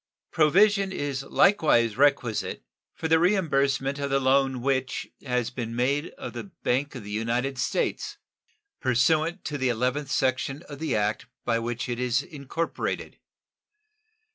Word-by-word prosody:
Provision 195 +5 +4
is 140 -6 -3
likewise 150 - +3
requisite 140 -5 +1 0.3
for 160 - -3
the 160 0 +4
reimbursement 140 -7 +1
of 140 0 -2
the 135 0 +2
loan 135 -1 +2
which 130 -1 -1 0.2
has 125 -2 -1
been 115 -2 -5
made 140 +6 +1
of - - -7
the - - -6
Bank 145 -7 -2
of 125 - -7
the 105 - -8
United 120 +5 -1
States, - - -1 0.6
pursuant 155 +7 +1
to 145 -2 -3
the 130 -1 +1
eleventh 125 +4 -1
section 130 +3 0
of 145 -2 -10
the 160 -5 -1
act 105 0 -1 0.2
by 115 -1 +1
which 120 +2 -3
it 120 -1 -3
is 125 +1 +1
incorporated. 150 +3 -4
135 Hz, 140 wpm, -26 LUFS, 125-150 Hz, 0.6 s, Provision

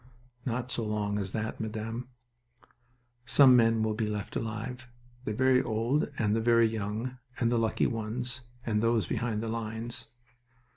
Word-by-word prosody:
"Not 125 +1 -2
so 115 - -1
long 105 -1 -1
as 95 -2 -3
that, 110 +1 -3
Madame. 110 +2 -4 1.2
Some 130 +2 +7
men 115 -2 +4
will 110 0 +1
be 110 0 -1
left 105 -2 -4
alive. 115 +3 -4 0.4
The 105 - -1
very 130 +1 +4
old 115 +7 0
and 105 -1 +2
the 115 - +1
very 115 0 +5
young, 110 +3 -3 0.2
and 115 -1 +2
the 120 - +3
lucky 110 -1 +1
ones, 120 +2 -2 0.2
and 105 -2 +1
those 115 -3 +2
behind 110 +4 -1
the 115 - -3
lines." 115 +1 -3
115 Hz, 155 wpm, -30 LUFS, 110-120 Hz, 1.2 s, Some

